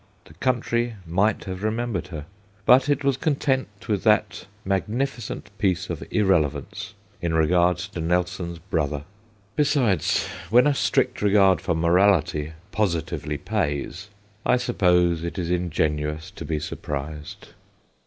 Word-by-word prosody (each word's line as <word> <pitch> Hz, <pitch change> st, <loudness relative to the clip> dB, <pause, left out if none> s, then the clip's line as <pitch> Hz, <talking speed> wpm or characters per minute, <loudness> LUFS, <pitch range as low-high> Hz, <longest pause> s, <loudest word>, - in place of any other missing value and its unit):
The -, -, -16 dB
country 120 Hz, +4 st, 0 dB
might 95 Hz, +6 st, +1 dB
have 95 Hz, -2 st, -5 dB
remem 115 Hz, +3 st, -1 dB
bered 85 Hz, -2 st, -2 dB
her, 80 Hz, -5 st, -7 dB, 0.4 s
but 130 Hz, +3 st, +6 dB
it 140 Hz, -1 st, +1 dB
was 140 Hz, -2 st, +2 dB
content 130 Hz, -8 st, -1 dB
with 105 Hz, -4 st, 0 dB
that 105 Hz, -2 st, +2 dB, 0.2 s
magnificent 105 Hz, +2 st, -2 dB
piece 95 Hz, -3 st, 0 dB
of 80 Hz, -, -5 dB
irrelevance 80 Hz, -9 st, 0 dB, 0.3 s
in 85 Hz, -2 st, 0 dB
regard 85 Hz, +2 st, +3 dB
to 90 Hz, -1 st, -5 dB
Nelson's 90 Hz, 0 st, -1 dB
brother. 75 Hz, -4 st, -2 dB, 0.5 s
Besides, 140 Hz, -, +2 dB, 0.2 s
when 125 Hz, +4 st, +6 dB
a 145 Hz, -, +4 dB
strict 130 Hz, -2 st, +1 dB
regard 100 Hz, -2 st, +4 dB
for 85 Hz, -, 0 dB
morality 85 Hz, -3 st, +2 dB, 0.2 s
positively 85 Hz, -7 st, -1 dB
pays... 90 Hz, +1 st, -2 dB, 0.3 s
I 125 Hz, -, +3 dB
suppose 90 Hz, -8 st, +2 dB
it 85 Hz, +3 st, -4 dB
is 90 Hz, -2 st, -2 dB
ingenuous 80 Hz, -3 st, -1 dB
to -, -, -8 dB
be 80 Hz, -, -1 dB
surprised. 75 Hz, -1 st, -6 dB
90 Hz, 130 wpm, -24 LUFS, 80-110 Hz, 0.5 s, but